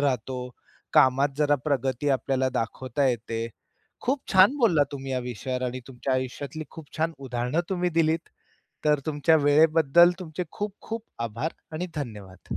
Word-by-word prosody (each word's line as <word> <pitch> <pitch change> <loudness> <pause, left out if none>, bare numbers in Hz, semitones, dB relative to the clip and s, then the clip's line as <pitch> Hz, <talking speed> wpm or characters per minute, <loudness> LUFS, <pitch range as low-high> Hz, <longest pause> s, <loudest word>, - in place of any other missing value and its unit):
राहतो, 125 -2 -1 0.4
कामात 135 +2 +5
जरा 145 -1 +3
प्रगती 135 -1 0
आपल्याला 130 0 +1
दाखवता 130 +4 -1
येते. 115 -1 -2 0.5
खूप 270 +2 0
छान 195 +9 +6
बोललात 170 - +4
तुम्ही 135 -1 -5
या 130 - +1
विषयावर 125 +1 -4
आणि 125 +1 -4
तुमच्या 130 +1 -3
आयुष्यातली 135 +4 -4
खूप 160 -3 -12
छान 165 +1 0
उदाहरणं 125 +3 -1
तुम्ही 180 -2 0
दिलीत, 165 0 +1 0.6
तर 150 -1 +3
तुमच्या 155 +1 +3
वेळेबद्दल 160 +3 +6
तुमचे 175 +1 -4
खूप-खूप 210 +2 -5 0.2
आभार 115 +9 -3 0.2
आणि 175 +4 -3
धन्यवाद. 105 -9 -6
140 Hz, 140 wpm, -26 LUFS, 125-160 Hz, 0.6 s, छान